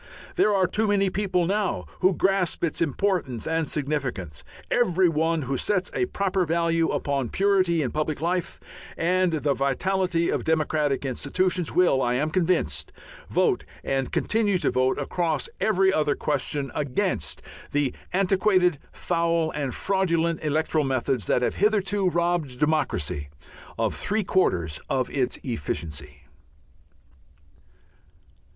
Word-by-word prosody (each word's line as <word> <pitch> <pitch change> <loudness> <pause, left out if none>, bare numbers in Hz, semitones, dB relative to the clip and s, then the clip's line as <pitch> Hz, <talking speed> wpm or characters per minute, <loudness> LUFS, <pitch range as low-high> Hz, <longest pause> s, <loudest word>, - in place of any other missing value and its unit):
There 215 - +3
are 195 -2 +3
too 210 +4 +1
many 200 -2 +2
people 185 -3 0
now 195 - -1
who 185 0 +3
grasp 190 -2 +1
its 165 -1 -1
importance 160 - 0
and 160 -1 0
significance. 135 - -3 0.3
Every 190 -7 +3
one 160 0 +1
who 135 +1 -2
sets 185 +5 0
a 375 - 0
proper 195 - 0
value 165 0 +1
upon 140 -4 -1
purity 185 -5 +2
in 125 - -2
public 155 -1 -2
life 175 +2 -2 0.4
and 180 +1 +2
the 145 -2 +1
vitality 170 +6 0
of - - -1
democratic 155 -3 0
institutions 175 +7 -1
will, 175 -7 +3
I 120 -1 +1
am 150 +5 0
convinced, 180 +1 0 0.4
vote 410 -6 +2 0.2
and 135 -1 -1
continue 210 -3 +1
to 170 - 0
vote 130 +1 +1
across 155 0 -1
every 190 -3 +3
other 150 -3 +1
question 145 -2 -2
against 145 - -1 0.3
the 145 -3 0 0.2
antiquated, 185 -3 +2
foul, 170 -2 0
and 140 -3 -3
fraudulent 170 -2 0
electoral 155 +1 +1
methods 130 -5 -1
that 125 - +2
have - - -1
hitherto 205 -2 +2
robbed 170 -6 -1
democracy 85 - 0 0.5
of - - 0
three 215 +1 -1
quarters 85 - 0
of 130 -2 0
its 130 -3 0
efficiency. 75 - -5
165 Hz, 130 wpm, -25 LUFS, 140-185 Hz, 0.5 s, There